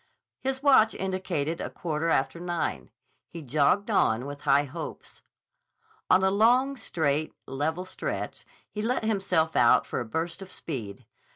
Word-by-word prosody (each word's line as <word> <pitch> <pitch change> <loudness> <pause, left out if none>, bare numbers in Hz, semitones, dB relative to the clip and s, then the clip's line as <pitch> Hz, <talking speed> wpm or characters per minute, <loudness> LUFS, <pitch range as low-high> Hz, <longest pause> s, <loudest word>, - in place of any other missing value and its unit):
His 265 +1 -2
watch 260 -6 +5
indicated 185 -5 -2
a - - -3
quarter 165 -1 -2
after 165 +2 +1
nine. 170 - -3 0.4
He 165 -2 -8
jogged 155 - +2
on 120 - +2
with 145 0 -7
high 140 +1 +4
hopes. 140 - -8 0.9
On 190 - +5
a 190 - +3
long, 245 +7 +3
straight, 155 - -1
level 160 +6 -2
stretch 185 - -5 0.3
he 210 - -4
let 235 +2 0
himself 190 -7 +1
out 120 -1 +5
for - - -3
a 120 - -3
burst 165 - -3
of 190 -1 -9
speed. 110 -11 -6
170 Hz, 150 wpm, -27 LUFS, 145-200 Hz, 0.9 s, watch